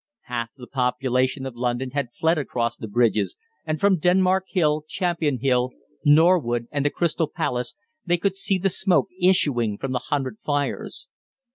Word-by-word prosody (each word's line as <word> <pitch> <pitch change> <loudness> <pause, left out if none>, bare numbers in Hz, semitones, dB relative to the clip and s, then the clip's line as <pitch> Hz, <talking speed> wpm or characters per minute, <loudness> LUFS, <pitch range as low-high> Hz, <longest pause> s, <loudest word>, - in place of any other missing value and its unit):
Half 120 -2 -4
the 125 - -10
population 130 +1 0
of 130 -3 -6
London 125 +1 -2
had 140 -3 -2
fled 160 0 +2
across 120 -4 -2
the 110 - -7
bridges, 110 -1 +1 0.3
and 155 0 -1
from 200 -3 +3
Denmark 185 +2 +3
Hill, 155 -5 +1
Champion 170 -7 -1
Hill, 125 0 +1 0.3
Norwood, 145 -7 +4
and 145 -1 -1
the 145 - +2
Crystal 165 0 0
Palace 125 -3 -3 0.3
they 175 -1 +1
could 195 +2 0
see 195 0 +1
the 190 +1 0
smoke 190 0 +2
issuing 130 - +2
from 135 - -4
the 125 - -2
hundred 130 -6 -2
fires. 145 -1 -3
140 Hz, 160 wpm, -24 LUFS, 125-175 Hz, 0.3 s, Norwood